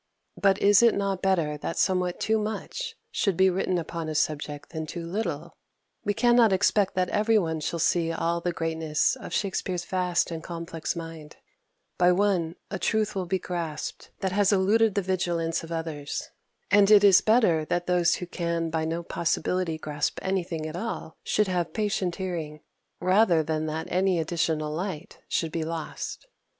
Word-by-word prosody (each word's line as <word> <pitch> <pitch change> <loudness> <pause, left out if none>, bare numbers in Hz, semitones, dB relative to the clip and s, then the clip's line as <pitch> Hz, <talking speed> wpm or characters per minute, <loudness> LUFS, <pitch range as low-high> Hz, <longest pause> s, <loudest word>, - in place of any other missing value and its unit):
But 195 -1 +3
is 205 +1 +6
it 235 -1 +5
not 195 -2 -1
better 165 -6 +1
that 165 - -4
somewhat 180 -2 +1
too 220 0 +1
much 455 - -4 0.2
should 195 -6 0
be 190 0 +5
written 185 0 0
upon 165 -1 -4
such - - -3
a - - +5
subject 150 -1 -3
than 160 -1 -4
too 170 +1 -6
little? 200 +7 -3 0.5
We 205 -2 0
cannot 240 -2 +5
expect 195 +1 +2
that 185 -1 +1
every 215 +1 +3
one 160 -5 0
shall 160 +3 -2
see 165 0 +1
all 170 +1 -1
the 175 - -1
greatness 160 -2 0
of - - -9
Shakspere's 185 -3 -2
vast 180 -2 0
and 165 -1 -4
complex 165 -2 -4
mind 165 -2 -8 0.6
by 180 0 +6
one 180 -4 +1 0.2
a 195 - -3
truth 215 +1 0
will 185 -2 -3
be 190 +2 +1
grasped 170 -4 -5
that 190 - 0
has 200 +1 +3
eluded 210 +2 +3
the 200 - +1
vigilance 175 -3 -1
of 165 - -9
others; 160 -3 -4 0.4
and 200 0 +6
it 210 -1 +7
is 195 -2 +7
better 215 -9 +3
that 175 +2 -1
those 175 -1 +3
who 180 - -5
can 170 -2 -2
by 160 0 -1
no 165 +2 -2
possibility 170 0 -1
grasp 150 -1 -2
anything 175 -4 -2
at 155 +1 -5
all 180 -4 -5
should 210 -1 +1
have 175 -3 -1
patient 200 -5 -1
hearing, 165 -5 -4 0.4
rather 185 -2 +4
than 155 0 -2
that 155 +1 -3
any 185 0 +2
additional 160 -2 -1
light 180 -1 -5
should 165 -2 -1
be 165 0 -2
lost. 165 - -5
175 Hz, 175 wpm, -26 LUFS, 165-195 Hz, 0.6 s, it